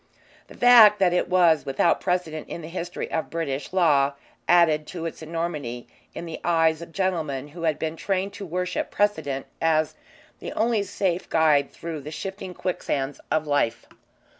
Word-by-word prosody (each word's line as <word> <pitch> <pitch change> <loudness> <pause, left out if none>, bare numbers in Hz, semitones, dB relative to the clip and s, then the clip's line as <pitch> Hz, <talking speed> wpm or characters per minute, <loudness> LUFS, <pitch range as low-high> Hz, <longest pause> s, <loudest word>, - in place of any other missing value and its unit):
The - - -14
fact 230 -4 +8
that 185 -3 +3
it 180 - 0
was 175 -4 +4
without 135 +5 +1
precedent 165 -4 -2
in 170 - -6
the - - -7
history 175 0 -5
of 160 - -2
British 145 -4 -3
law 145 -7 +3 0.4
added 160 -3 +4
to 170 -3 -6
its 165 - -6
enormity 155 -7 -4 0.3
in - - -6
the 165 - -7
eyes 165 -1 +2
of 170 - -9
gentlemen 160 -7 -2
who 165 +3 -10
had 160 -2 +1
been 160 0 -3
trained 195 +3 -2
to 200 - -7
worship 180 +2 -2
precedent 160 -10 0 0.2
as 155 -1 +2 0.5
the - - -6
only 225 -1 +1
safe 190 -2 -2
guide 150 -3 +3
through 165 -3 -7
the 145 - -8
shifting 190 +3 -6
quicksands 145 -6 -3
of 155 0 +1
life. 145 -6 0
165 Hz, 165 wpm, -25 LUFS, 150-180 Hz, 0.5 s, fact